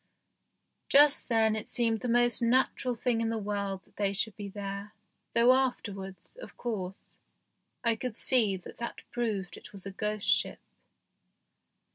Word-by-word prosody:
Just 290 -1 +6
then 220 -2 +3
it 215 - -5
seemed 230 -2 +1
the 250 - -4
most 240 0 +3
natural 250 +1 +2
thing 235 0 0
in 225 - 0
the 225 - -1
world 200 -2 -3
that - - -29
they 200 -1 +1
should 210 0 -1
be 205 -1 -6
there, 200 +1 -6 0.4
though 235 +2 +6
afterwards, 205 - -3
of - - -11
course, 195 -6 -5 0.7
I 230 -1 +3
could 240 -1 -5
see 220 -7 +3
that 180 - -12
that 235 - -6
proved 215 -7 -2
it - - -12
was 195 -2 -10
a 195 - -5
ghost 210 +1 -3
ship. - - +2
220 Hz, 155 wpm, -30 LUFS, 200-240 Hz, 0.7 s, Just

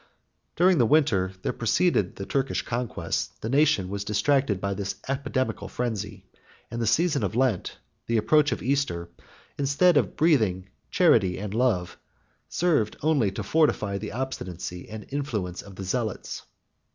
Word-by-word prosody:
During 180 -1 +4
the 120 - +4
winter 110 -11 +3
that - - -3
preceded 115 - +2
the 95 - -6
Turkish 135 +3 -1
conquest, 115 -9 -3
the 110 - -2
nation 140 -9 +3
was 100 +1 -4
distracted 105 +1 +1
by 100 +1 -1
this 100 0 -4
epidemical 130 -6 -2
frenzy; 105 -3 -4 0.5
and 115 - -3
the 115 - 0
season 150 +5 +2
of - - -2
Lent, 125 -6 0 0.3
the 115 - +1
approach 150 +6 +3
of - - -3
Easter, 130 -11 -1 0.5
instead 145 +5 +4
of - - +1
breathing 110 - +2 0.2
charity 110 - +4
and 105 0 -5
love, 110 -7 0 0.5
served 155 -12 +1
only 145 -9 +3
to 95 - -5
fortify 110 -11 +1
the - - -5
obstinacy 90 -9 -5
and 110 -1 -7
influence 110 -11 -3
of 100 -2 -13
the 95 - -6
zealots. 110 +2 -3
115 Hz, 150 wpm, -26 LUFS, 100-140 Hz, 0.5 s, During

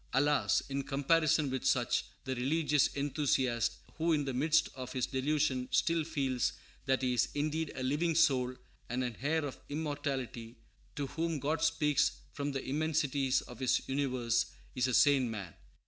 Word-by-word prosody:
Alas! 145 +3 +3
in 140 0 -2
comparison 145 +1 +2
with 130 -1 -2
such, - - +2 0.2
the 130 - -2
religious 145 +3 +2
enthusiast, 135 -4 0 0.2
who 165 +1 +2
in 145 -2 +1
the 135 - -2
midst 155 +5 +3
of 130 -1 -7
his 130 -2 0
delusion 135 -1 0
still 165 -1 +2
feels 135 -6 -1 0.3
that 130 0 +2
he 125 -1 +2
is 120 - +2
indeed 155 +1 -1
a 130 - -4
living 155 +5 +1
soul 130 -6 +3 0.3
and 125 +2 -1
an 120 -2 -3
heir 155 +2 +1
of 140 - -6
immortality, 140 -6 -3 0.4
to 145 - -2
whom 165 +3 -2
God 150 +3 -1
speaks 160 -3 +2 0.2
from 145 0 -2
the 135 -1 -4
immensities 145 -2 +1
of 120 - -12
His 130 -2 +1
universe, 125 -4 0 0.3
is 130 0 +1
a 130 - -1
sane 140 -4 +5
man. 100 -7 -6
140 Hz, 165 wpm, -32 LUFS, 130-150 Hz, 0.4 s, sane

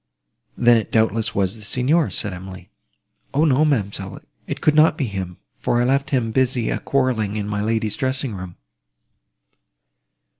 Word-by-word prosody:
"Then 120 -1 +5
it 110 - -3
doubtless 110 0 +1
was 95 +1 +1
the - - -13
Signor," 135 - +2
said 105 -3 -2
Emily. 95 0 -10 0.6
"O 150 +3 +4
no, 145 -1 +3
ma'amselle, 100 -9 -1 0.3
it - - -4
could 155 - +3
not 155 +1 +5
be 140 - 0
him, 95 -5 -5 0.2
for 120 - -1
I 120 - +2
left 140 +3 +1
him 125 -6 0
busy 125 -1 +1
a - - -1
quarrelling 125 -7 0
in 105 -1 -3
my 105 0 -2
lady's 110 -1 0
dressing 130 -2 -1
room!" 90 -2 -8
115 Hz, 160 wpm, -21 LUFS, 100-130 Hz, 0.6 s, Then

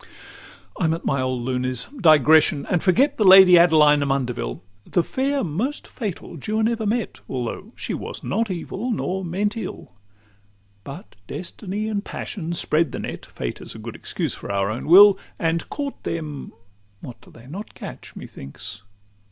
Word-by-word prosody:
XII - - -18 0.7
I'm 160 -3 +2
"at 165 - -9
my 135 -1 +1
old 130 -2 -2
lunes" 125 -1 -1
digression, 155 - +5
and 175 - +2
forget 270 +10 +3
The 215 - +2
Lady 190 -1 +9
Adeline 155 -3 +6
Amundeville; 125 - -2 0.2
The 175 - 0
fair 275 +5 -1
most 210 - -3
fatal 195 -6 -6
Juan 215 +8 0
ever 225 -2 -1
met, 225 0 -2
Although 125 - -4
she - - -4
was - - -6
not 225 -1 -1
evil 190 +6 -4
nor 190 -4 -2
meant 200 +5 -1
ill; 210 - -7 0.9
But 155 - -10
Destiny 200 +3 -5
and 205 -2 -2
Passion 170 -7 -5
spread 160 -3 0
the - - -3
net - - -6
(Fate - - -6
is - - -8
a - - -8
good - - -7
excuse - - -3
for - - -7
our 100 +1 0
own 115 - -5
will), 195 +4 +8 0.2
And 165 0 -1
caught 285 -1 -5
them; 155 -4 -5 0.5
what 125 - -10
do - - -18
they 115 - -16
not 185 +11 -8
catch, - - -9
methinks? 70 +10 -9
170 Hz, 165 wpm, -23 LUFS, 140-210 Hz, 0.9 s, Lady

